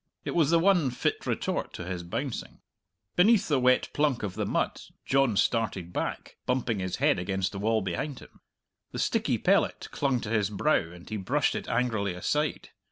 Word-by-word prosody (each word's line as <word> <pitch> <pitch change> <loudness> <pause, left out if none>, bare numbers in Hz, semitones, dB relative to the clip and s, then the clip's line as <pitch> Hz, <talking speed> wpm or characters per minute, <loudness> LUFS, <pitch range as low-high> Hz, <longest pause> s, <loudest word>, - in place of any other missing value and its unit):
It - - -2
was 160 -5 +3
the 170 - +5
one 175 -5 +4
fit 125 - -2
retort - - -2
to 90 - -6
his 90 -1 -4
bouncing. 115 +9 -5 0.5
Beneath 205 +3 +5
the 145 -4 +2
wet 125 0 +3
plunk 145 -6 +1
of 100 -3 -2
the 105 0 -2
mud - - -1 0.2
John 135 -6 +2
started 95 -7 0
back, - - -4
bumping 125 -4 0
his 95 -1 -2
head - - +2
against 95 +1 -1
the 100 - -6
wall 110 0 +1
behind 110 - -3
him. - - -15 0.5
The - - -4
sticky - - +1
pellet - - +1
clung 135 -3 +1
to 105 - -5
his 105 -3 +2
brow, 100 - +1
and 85 0 -13
he 110 - -3
brushed 95 - +1
it - - -5
angrily 110 -6 0
aside. 150 +11 -1
115 Hz, 185 wpm, -28 LUFS, 95-135 Hz, 0.5 s, the